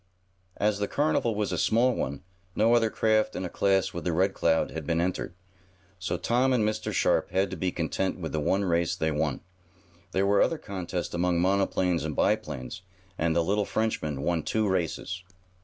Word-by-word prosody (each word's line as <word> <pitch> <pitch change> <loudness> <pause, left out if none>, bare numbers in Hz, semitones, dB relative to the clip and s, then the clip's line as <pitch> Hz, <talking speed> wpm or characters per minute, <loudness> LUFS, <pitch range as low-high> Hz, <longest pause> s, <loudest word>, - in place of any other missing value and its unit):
As 105 0 +1
the 100 - 0
carnival 140 -6 +1
was 105 -2 -1
a 90 - -1
small 120 +3 +3
one, 70 - -3 0.3
no 115 +2 +4
other 115 -2 +4
craft 110 0 +1
in 95 - -3
a - - -4
class 95 0 +1
with 85 - -5
the 90 - 0
Red 95 +4 +2
Cloud 80 -1 +1
had 80 -3 -6
been 85 0 +1
entered, 85 -1 -2 0.6
so 90 - -2
Tom 130 +2 +2
and 120 -4 +2
Mr. 110 - -2
Sharp - - +2
had 95 +1 0
to - - -3
be 90 +1 -1
content 90 +3 -2
with 80 -3 -4
the 80 - -1
one 95 +7 +1
race 85 -1 +1
they 80 -3 0
won. 75 -1 -1 0.7
There 95 +1 +1
were 100 0 +4
other 165 - +2
contests 95 - -5
among 85 0 +1
monoplanes 95 -2 +1
and 75 -1 -3
biplanes, 70 +4 -1 0.4
and 80 0 +1
the 85 - +3
little 100 +4 +1
Frenchman 80 -11 -2
won 85 0 +1
two 110 +7 0
races. 95 0 -2
95 Hz, 190 wpm, -27 LUFS, 85-105 Hz, 0.7 s, no